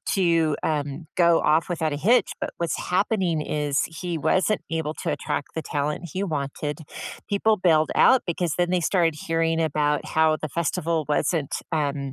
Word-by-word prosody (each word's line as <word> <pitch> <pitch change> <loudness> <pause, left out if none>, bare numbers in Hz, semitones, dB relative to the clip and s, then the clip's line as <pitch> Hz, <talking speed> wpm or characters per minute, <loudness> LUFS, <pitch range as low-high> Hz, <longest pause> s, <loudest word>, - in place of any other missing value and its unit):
to, 165 -5 +2
um, 150 0 -2
go 170 -2 +4
off 160 +4 +2
without 160 -3 -1
a - - -1
hitch, 225 +12 +3
but - - -1
what's 170 -1 -1
happening 185 -3 +1
is 145 -2 0
he 170 0 -5
wasn't 190 +7 +1
able 160 -1 -2
to - - -1
attract 145 - -3
the 160 - -2
talent 150 +3 -3
he 190 - -2
wanted. 150 -2 -3 0.5
People 215 +2 +2
bailed 160 -4 +3
out 260 - +5
because 170 -2 -1
then 175 0 +1
they 180 -1 +2
started 165 -2 +2
hearing 165 0 +1
about 150 -1 0
how 160 0 +3
the 155 - -3
festival 165 0 -1
wasn't, 150 0 0 0.2
um 145 -3 0
160 Hz, 170 wpm, -24 LUFS, 150-175 Hz, 0.5 s, out